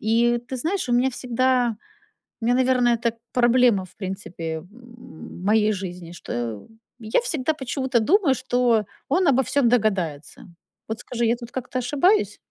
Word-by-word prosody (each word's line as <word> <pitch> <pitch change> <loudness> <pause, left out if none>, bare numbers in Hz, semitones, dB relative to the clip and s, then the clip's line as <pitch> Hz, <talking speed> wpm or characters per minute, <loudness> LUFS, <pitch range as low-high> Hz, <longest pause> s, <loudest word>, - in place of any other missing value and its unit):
И 235 +2 +2
ты 260 - -4
знаешь, 330 +6 -2
у - - 0
меня 250 +2 +3
всегда 250 -1 0 0.6
у - - -5
меня, 240 +2 +3
наверное, 250 -2 +3
так 230 0 -2 0.2
проблема, 240 -4 +4
в 185 - -18
принципе, 180 -5 -5
моей 220 -3 -2
жизни, 180 -3 -6
что 120 - -5 0.3
я 220 -1 +1
всегда 315 - -1
почему-то 265 -2 -1
думаю, 315 - +3
что 245 -3 +1 0.2
он 360 +6 +2
обо 265 -3 +4
всём 270 -1 +2
догадается. 195 -11 -1 0.4
Вот 220 0 -4
скажи, 240 -1 -3
я 230 +2 +2
тут 235 -1 -10
как-то 255 0 -4
ошибаюсь? 295 - +2
240 Hz, 150 wpm, -23 LUFS, 215-255 Hz, 0.6 s, проблема